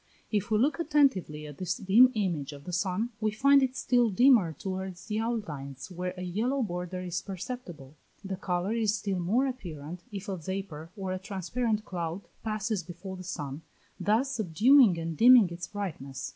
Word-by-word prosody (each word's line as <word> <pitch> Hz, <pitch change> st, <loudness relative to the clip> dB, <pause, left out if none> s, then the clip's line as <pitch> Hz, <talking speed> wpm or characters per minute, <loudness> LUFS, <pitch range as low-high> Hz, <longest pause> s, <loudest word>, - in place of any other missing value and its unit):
If 210 Hz, 0 st, 0 dB
we 215 Hz, -, +3 dB
look 285 Hz, +9 st, +2 dB
attentively 270 Hz, -, +2 dB
at 145 Hz, -2 st, -10 dB
this 180 Hz, -1 st, -2 dB
dim 225 Hz, +7 st, +6 dB
image 170 Hz, -9 st, -1 dB
of 140 Hz, 0 st, -11 dB
the 180 Hz, -, -7 dB
sun, 190 Hz, +6 st, -1 dB
we 215 Hz, 0 st, +1 dB
find 275 Hz, +6 st, +5 dB
it 260 Hz, 0 st, 0 dB
still 245 Hz, -2 st, +3 dB
dimmer 220 Hz, -4 st, +5 dB
towards 190 Hz, +3 st, -5 dB
the 215 Hz, 0 st, -2 dB
outlines 165 Hz, -, -4 dB
where 180 Hz, +1 st, -4 dB
a 180 Hz, -, -5 dB
yellow 235 Hz, +9 st, 0 dB
border 180 Hz, -2 st, -4 dB
is 180 Hz, -1 st, -3 dB
perceptible. 185 Hz, -, -7 dB, 0.3 s
The 195 Hz, -1 st, -3 dB
colour 180 Hz, +2 st, -1 dB
is 220 Hz, -2 st, +1 dB
still 200 Hz, -3 st, -2 dB
more 215 Hz, +10 st, +2 dB
apparent 175 Hz, -, -6 dB
if 200 Hz, 0 st, -6 dB
a 195 Hz, -2 st, -3 dB
vapour 165 Hz, -2 st, -5 dB
or 190 Hz, -2 st, -3 dB
a 185 Hz, -, -3 dB
transparent 210 Hz, +3 st, -2 dB
cloud 175 Hz, +1 st, -4 dB, 0.2 s
passes 215 Hz, -2 st, -1 dB
before 180 Hz, +3 st, -8 dB
the 185 Hz, -, -8 dB
sun, 145 Hz, -5 st, -5 dB, 0.4 s
thus 220 Hz, +9 st, +2 dB
subduing 220 Hz, -, +5 dB
and 165 Hz, 0 st, -3 dB
dimming 235 Hz, -2 st, +7 dB
its 175 Hz, +1 st, -6 dB
brightness. 155 Hz, -10 st, -5 dB
190 Hz, 175 wpm, -29 LUFS, 175-225 Hz, 0.4 s, dimming